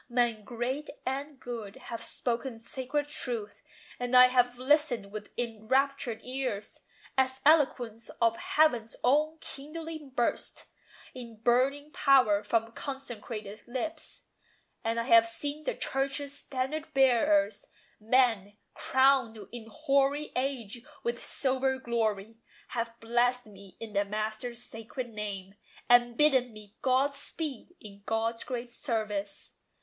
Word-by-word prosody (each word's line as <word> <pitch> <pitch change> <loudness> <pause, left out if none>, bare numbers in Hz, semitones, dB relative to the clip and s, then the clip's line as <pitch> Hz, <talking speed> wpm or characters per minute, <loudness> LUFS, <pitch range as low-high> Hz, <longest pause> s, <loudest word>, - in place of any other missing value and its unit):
Men 240 -3 +1
great 250 +6 -3 0.2
and 275 +2 -3
good 230 -6 -6
have 245 -3 -7
spoken 240 0 -2
sacred 260 +5 -3
truth; 235 -8 -4 0.4
And 245 0 +3
I 250 0 +9
have 245 -1 +3
listened 255 -6 +2
with 210 0 -7
enraptured 245 +2 0
ears, 255 -5 -3 0.4
As 260 0 +2
eloquence 250 -7 +3
of 230 -1 +3
Heaven's 240 -8 +2
own 300 +5 +3
kindling 315 +1 -7
burst 245 -2 -1 0.5
In 235 -3 -9
burning 260 +6 +2
power 250 -10 +5
from 225 +2 0
consecrated 225 -6 -6
lips. 310 +6 -5 0.6
And 230 +1 0
I - - 0
have 230 -2 +6
seen 290 +6 -5
the - - -1
Church's 275 +1 -2
standard 290 +4 -3
bearers: 220 -6 +3 0.3
Men, 220 -3 +2 0.2
crowned 260 -4 +3
in 235 -2 -8
hoary 280 +5 +1
age 250 -4 -2 0.2
with 235 0 -2
silver 265 0 0
glory, 225 -3 -1 0.3
Have 230 -1 -3
blessed 245 +2 +1
me 200 -2 -14
in 225 -2 -7
the 200 0 +3
Master's 215 +4 -3
sacred 240 +2 -6
name, 200 -3 -5 0.3
And 240 -1 +5
bidden 260 -5 +4
me 210 -1 -13
God 265 +2 +3
speed 300 +2 -4
in 200 -1 -12
God's 225 +1 0
great 245 -1 -5
service. 215 -6 -3
245 Hz, 125 wpm, -30 LUFS, 225-270 Hz, 0.6 s, I